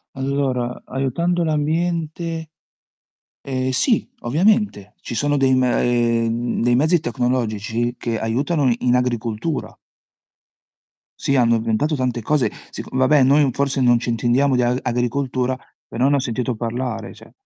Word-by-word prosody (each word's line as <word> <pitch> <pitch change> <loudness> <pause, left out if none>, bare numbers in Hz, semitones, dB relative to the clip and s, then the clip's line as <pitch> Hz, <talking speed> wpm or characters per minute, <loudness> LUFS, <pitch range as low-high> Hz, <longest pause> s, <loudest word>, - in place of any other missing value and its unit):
Allora, 130 -2 -2
aiutando 155 +7 -1
l'ambiente 165 +1 -1 0.9
ehm, 130 -1 -2
sì 220 - +1
ovviamente. 170 - +1
Ci - - -6
sono 145 +6 +1
dei 135 -1 +3
m 130 - +3
ehm, 120 -1 +1
dei 120 0 +3
mezzi 155 +7 +3
tecnologici 120 -2 -1
che 115 -2 -2
aiutano 135 +4 +1
in 125 0 +1
agricoltura. 125 +3 -2 1.4
Sì, 140 - 0
hanno 120 -3 +4
inventato 115 +7 0
tante 125 -2 -1
cose, 145 +3 +1 0.2
seco - - -8
vabbè 130 +2 +4
noi 140 +2 +4
forse 140 +1 -1
non 120 -1 +4
ci 120 - -4
intendiamo 125 +4 +2
di 125 - +2
a 120 +1 +1
agricoltura, 125 +1 -1 0.3
però 125 +3 0
ne 145 - +3
ho - - +2
sentito 125 0 -2
parlare 115 -1 -4
cioè - - -16
130 Hz, 135 wpm, -21 LUFS, 120-145 Hz, 1.4 s, hanno